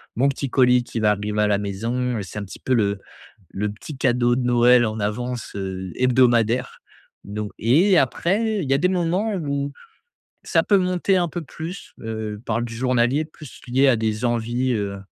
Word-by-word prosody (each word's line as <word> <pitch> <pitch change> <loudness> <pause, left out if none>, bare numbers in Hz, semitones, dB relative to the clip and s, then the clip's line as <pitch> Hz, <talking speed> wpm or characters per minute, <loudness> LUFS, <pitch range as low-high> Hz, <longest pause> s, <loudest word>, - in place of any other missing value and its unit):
mon 135 +4 +3
petit 140 -1 -3
colis 125 -1 +4
qui 115 - -4
va 105 - +4
arriver 105 +1 -1
à 105 - +3
la 105 -1 +2
maison» 115 +5 -2
et 100 - -4
c'est 95 +3 -7
un 100 - -5
petit - - -11
peu 130 - -1
le 100 -4 +1 0.5
le 105 +2 -2
petit 120 +8 -9
cadeau 120 -2 +2
de - - 0
Noël 120 0 +5
en 110 0 -3
avance, 120 +4 -3
heu, 95 -2 -5
hebdomadaire. 125 -2 +2 0.5
Donc 105 0 -5
et 170 - +4
après 200 - +1
il 135 - -5
y - - +6
a - - +3
des 180 +5 +2
moments 185 +4 0
où 140 -4 -2 0.7
ça - - +2
peut 200 - +4
monter 185 +1 +1
un 175 -1 +1
peu 175 +2 -5
plus, 165 +4 -8
heu, 110 -2 -5
par 115 +1 -1
du 120 -1 -5
journalier, 125 +4 +1
plus 155 -3 -13
lié 135 +3 +3
à 125 - +4
des 110 +1 -2
envies, 120 +2 0
heu, 100 -2 -2
120 Hz, 195 wpm, -22 LUFS, 110-140 Hz, 0.7 s, y